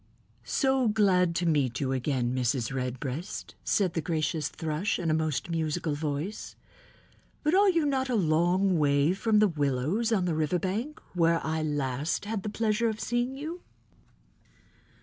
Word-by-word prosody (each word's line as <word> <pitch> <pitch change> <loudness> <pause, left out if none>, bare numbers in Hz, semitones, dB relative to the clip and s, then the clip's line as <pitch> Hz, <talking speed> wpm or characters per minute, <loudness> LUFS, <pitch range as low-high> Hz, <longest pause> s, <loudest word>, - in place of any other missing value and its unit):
"So 265 -3 +2
glad 190 -5 +3
to 175 +1 0
meet 140 -7 +1
you 135 -2 -1
again, 130 -2 0
Mrs. 125 -1 0
Redbreast," 130 - -4
said 185 -5 +1
the 165 - -1
gracious 155 -1 -1
Thrush 160 +6 -2
in 165 -2 -1
a - - +3
most 155 -1 -1
musical 160 -1 -1
voice, 150 +6 -4 0.9
"but 300 - +2
are 395 +1 +5
you 335 -4 +2
not 265 -2 0
a 245 - +1
long 175 +1 +2
way 145 +2 +3
from 210 +3 +1
the 210 0 +5
willows 155 - 0
on 195 -5 +2
the 175 - 0
river 155 +2 +1
bank 220 - -3
where 165 -2 +3
I 160 0 -1
last 145 +1 -1
had 215 -1 -3
the 210 - -4
pleasure 225 +1 +1
of 215 -1 -4
seeing 240 +3 -1
you?" 325 +5 -6
170 Hz, 160 wpm, -28 LUFS, 145-215 Hz, 0.9 s, are